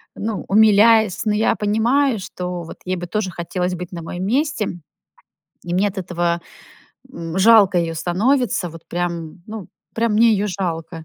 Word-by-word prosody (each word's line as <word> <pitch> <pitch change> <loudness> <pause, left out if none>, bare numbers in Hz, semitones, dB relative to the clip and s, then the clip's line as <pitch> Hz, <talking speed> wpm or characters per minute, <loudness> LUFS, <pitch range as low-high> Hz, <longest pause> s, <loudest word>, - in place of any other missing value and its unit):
ну, 215 -1 -4
умиляясь. 220 0 +4
Но 210 - +2
я 220 - +2
понимаю, 230 +5 +1
что 180 -2 -5
вот 165 - -10
ей 185 0 -1
бы 175 - -5
тоже 210 0 -2
бы - - -12
хотелось 180 +1 -2
быть 180 0 -7
на 170 -2 -6
моем 175 +3 -5
месте. 245 - -1 0.9
И 175 - -3
мне 190 +3 +2
от 200 - -10
этого, 175 -1 -1 0.7
м, 165 -2 -5
жалко 200 -3 +6
ее 165 -1 -1
становится. 200 - 0
Вот 165 0 -13
прям 170 -1 -4
ну, 215 -5 -8 0.3
прям 230 -1 +1
мне 225 +1 +5
ее 205 0 +1
жалко. 165 -3 -4
185 Hz, 170 wpm, -20 LUFS, 175-220 Hz, 0.9 s, жалко